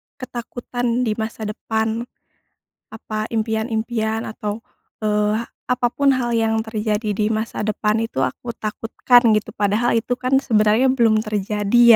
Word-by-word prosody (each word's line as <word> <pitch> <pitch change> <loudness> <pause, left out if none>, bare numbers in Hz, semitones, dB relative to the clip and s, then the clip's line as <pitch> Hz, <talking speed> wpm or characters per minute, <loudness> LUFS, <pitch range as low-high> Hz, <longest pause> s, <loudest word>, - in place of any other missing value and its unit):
ketakutan 245 0 -3
di 225 - 0
masa 220 0 -4
depan, 220 +2 -2 0.9
apa, 215 -1 -4
impian-impian 220 0 -1
atau, 210 0 -4 0.4
eee, 210 +1 +1 0.3
apa 250 -1 +1
pun 280 -1 +3
hal 240 -2 -1
yang 225 0 +1
terjadi 215 -1 -1
di 210 - +2
masa 220 +1 -2
depan 215 0 +1
itu 225 - -2
aku 240 - -6
takutkan 225 +3 +2 0.2
gitu 210 - -5
padahal 210 +4 +1
itu 240 +2 0
kan 265 +1 +2
sebenarnya 220 +1 +3
belum 225 -4 +3
terjadi 210 +2 +1
220 Hz, 130 wpm, -21 LUFS, 215-240 Hz, 0.9 s, pun